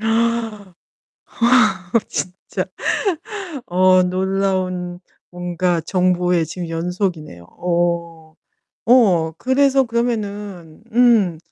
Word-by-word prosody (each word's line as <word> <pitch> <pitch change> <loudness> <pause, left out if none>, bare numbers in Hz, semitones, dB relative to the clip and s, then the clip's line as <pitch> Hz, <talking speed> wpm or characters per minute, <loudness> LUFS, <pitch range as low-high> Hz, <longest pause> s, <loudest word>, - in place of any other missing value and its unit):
아 225 -2 -1 1.4
진짜. 185 +1 -4 1.0
어 185 +1 +4
놀라운 185 -1 -1 0.3
뭔가 175 -1 -1
정보의 180 0 +1
지금 170 +2 -6
연속이네요. 165 - -3
오. 170 - -2 0.5
오 190 -10 +4
그래서 270 +4 +3
그러면은 210 -8 -4
음 230 -8 +4
185 Hz, 150 characters per minute, -19 LUFS, 175-210 Hz, 1.4 s, 어